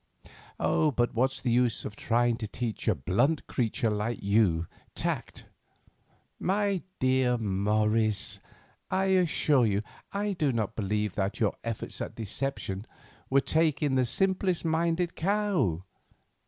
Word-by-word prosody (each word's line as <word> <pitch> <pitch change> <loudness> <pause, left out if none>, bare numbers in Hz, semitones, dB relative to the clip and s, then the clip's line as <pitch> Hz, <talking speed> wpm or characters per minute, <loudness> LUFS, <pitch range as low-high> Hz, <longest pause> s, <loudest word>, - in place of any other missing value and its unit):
But 125 -6 +1
what's 130 +3 0
the 125 - 0
use 120 -2 +2
of 105 - -6
trying 120 +1 +2
to 110 -3 -4
teach 115 0 -4
a - - +4
blunt 120 - +1
creature 115 -2 0
like 105 +3 -1
you 100 -5 +3 0.3
tact? - - -3 0.9
My 200 -1 +1 0.2
dear 130 -1 +2
Morris, 105 0 +1 0.5
I 190 +1 +1
assure 155 -8 +3
you 100 0 0 0.3
I 205 +1 -1
do 150 -6 +1
not 110 -2 -2
believe 105 -1 -1
that 100 +3 -2
your 110 -4 +2
efforts 115 -2 -4
at - - -5
deception 110 -2 -3 0.4
would 135 +1 +3
take 155 -2 +2
in 145 -2 +1
the 130 -2 +2
simplest 185 - +1
minded 165 +2 +1
cow. 180 - +1
120 Hz, 130 wpm, -29 LUFS, 105-160 Hz, 0.9 s, a